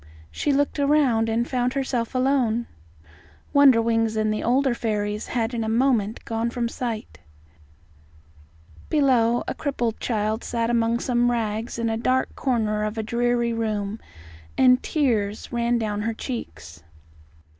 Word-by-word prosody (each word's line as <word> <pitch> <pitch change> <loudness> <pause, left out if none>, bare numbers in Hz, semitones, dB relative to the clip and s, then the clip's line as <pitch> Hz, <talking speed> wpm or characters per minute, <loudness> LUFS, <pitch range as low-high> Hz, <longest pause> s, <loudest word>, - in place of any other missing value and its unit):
She 295 - -1
looked 285 +1 0
around, 280 -6 +3
and 230 +2 0
found 250 -1 0
herself 255 -3 -2
alone. 255 -3 +1 0.9
Wonderwings 230 -5 +4
and 215 0 +1
the 215 - -3
older 260 +2 +2
fairies 210 -2 -2
had 230 0 -1
in 230 -1 -1
a 220 - -2
moment 230 -3 +1
gone 225 +1 -1
from 235 0 -2
sight. 230 -2 -5 1.7
Below, 245 -5 +3
a - - -2
crippled 240 -6 -2
child 220 -1 -1
sat 230 -1 -1
among 230 0 +2 0.3
rags 225 -1 -2
in 230 0 -1
a 225 0 -1
dark 255 +3 0
corner 215 -5 0
of 215 +1 -3
a 220 - -1
dreary 235 +1 0
room, 215 -2 -2 0.6
and 255 -1 +5
tears 220 -9 -1
ran 235 0 +1
down 210 -2 -2
her 225 +1 -2
cheeks. 80 - -7
230 Hz, 135 wpm, -24 LUFS, 220-250 Hz, 1.7 s, and